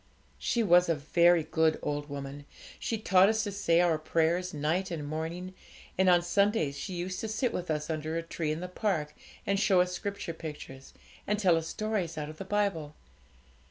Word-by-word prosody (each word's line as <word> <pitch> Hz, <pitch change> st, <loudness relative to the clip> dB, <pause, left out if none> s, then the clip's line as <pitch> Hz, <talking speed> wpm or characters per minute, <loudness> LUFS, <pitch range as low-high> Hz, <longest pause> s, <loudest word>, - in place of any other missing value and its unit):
'She 235 Hz, -, 0 dB
was 180 Hz, -3 st, +5 dB
a 165 Hz, -, +3 dB
very 170 Hz, +3 st, +3 dB
good 160 Hz, 0 st, +1 dB
old 145 Hz, 0 st, -3 dB
woman; 140 Hz, 0 st, -7 dB, 0.3 s
she 225 Hz, -, -2 dB
taught 190 Hz, -2 st, +5 dB
us 220 Hz, -1 st, +1 dB
to 205 Hz, -, -3 dB
say 170 Hz, -4 st, +2 dB
our 170 Hz, -3 st, +3 dB
prayers 165 Hz, +3 st, +1 dB
night 160 Hz, +6 st, -1 dB
and 160 Hz, -4 st, -4 dB
morning, 165 Hz, +4 st, -4 dB, 0.4 s
and 190 Hz, 0 st, +3 dB
on 175 Hz, -1 st, +5 dB
Sundays 200 Hz, -5 st, +1 dB
she 185 Hz, +7 st, -5 dB
used 180 Hz, +1 st, -4 dB
to 220 Hz, -, -3 dB
sit 220 Hz, +3 st, -1 dB
with 180 Hz, -1 st, -4 dB
us 150 Hz, -1 st, -1 dB
under 155 Hz, 0 st, -3 dB
a 165 Hz, -, -2 dB
tree 165 Hz, -2 st, -3 dB
in 155 Hz, +2 st, -3 dB
the 180 Hz, -, -4 dB
park, 180 Hz, -6 st, -2 dB, 0.3 s
and 200 Hz, 0 st, +1 dB
show 195 Hz, -3 st, +4 dB
us 180 Hz, 0 st, +2 dB
Scripture 200 Hz, -4 st, -4 dB
pictures, 150 Hz, -4 st, -9 dB, 0.3 s
and 210 Hz, -, +1 dB
tell 185 Hz, -5 st, +4 dB
us 165 Hz, 0 st, -2 dB
stories 205 Hz, -7 st, -2 dB
out 150 Hz, -1 st, -4 dB
of 155 Hz, -, -11 dB
the -, -, -4 dB
Bible. 190 Hz, -7 st, -1 dB
170 Hz, 195 wpm, -29 LUFS, 155-195 Hz, 0.4 s, was